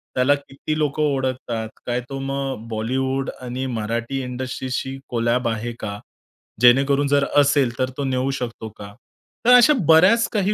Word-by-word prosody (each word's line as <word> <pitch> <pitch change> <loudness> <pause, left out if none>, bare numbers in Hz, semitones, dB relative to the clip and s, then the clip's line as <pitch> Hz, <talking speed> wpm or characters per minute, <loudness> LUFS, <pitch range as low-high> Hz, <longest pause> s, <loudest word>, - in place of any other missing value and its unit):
त्याला 130 +3 +4
किती 140 +2 -5
लोकं 150 0 0
ओळखतात? 130 -5 -2 0.2
काय 125 0 -1
तो 135 - -5
मग 135 -4 -4
बॉलिवूड 130 +5 -1
आणि 125 +1 -4
मराठी 115 +5 -2
इंडस्ट्रीशी 130 +1 -4
कोलॅब 120 +1 0
आहे 115 +1 -3
का, 100 -1 -5 0.6
जेणेकरून 135 +3 +5
जर 140 0 +3 0.2
असेल? 140 -3 +2
तर 130 - +1
तो 140 - -2
नेऊ 130 0 0
शकतो 115 -2 -5
का? 100 -1 -10 0.5
तर 245 - +7
अशा 250 +5 +7
बऱ्याच 185 +9 +6
काही 210 -1 +1
130 Hz, 150 wpm, -22 LUFS, 120-140 Hz, 0.6 s, तर